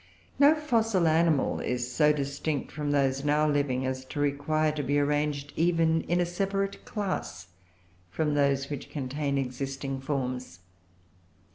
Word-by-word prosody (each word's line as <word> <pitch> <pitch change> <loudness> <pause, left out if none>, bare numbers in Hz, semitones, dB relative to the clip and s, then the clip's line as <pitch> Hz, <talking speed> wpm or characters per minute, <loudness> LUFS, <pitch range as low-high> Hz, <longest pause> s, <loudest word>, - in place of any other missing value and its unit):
No 290 +2 +7
fossil 225 - +1
animal 160 -3 +2
is 125 0 -2
so 150 +2 +4
distinct 140 0 -2
from 150 -1 -3
those 135 -1 +1
now 150 +1 +2
living 140 -3 0
as 130 0 -3
to 145 - -6
require 145 +2 +1
to 150 -1 -3
be 145 +1 0
arranged 145 0 0
even 165 -1 +2
in 175 +1 +1
a 175 - +2
separate 195 +2 -2
class 185 - -4 0.6
from 150 - -1
those 140 -1 +1
which 145 -1 -5
contain 140 0 -2
existing 135 +1 -3
forms. 125 - -3
145 Hz, 140 wpm, -28 LUFS, 135-160 Hz, 0.6 s, No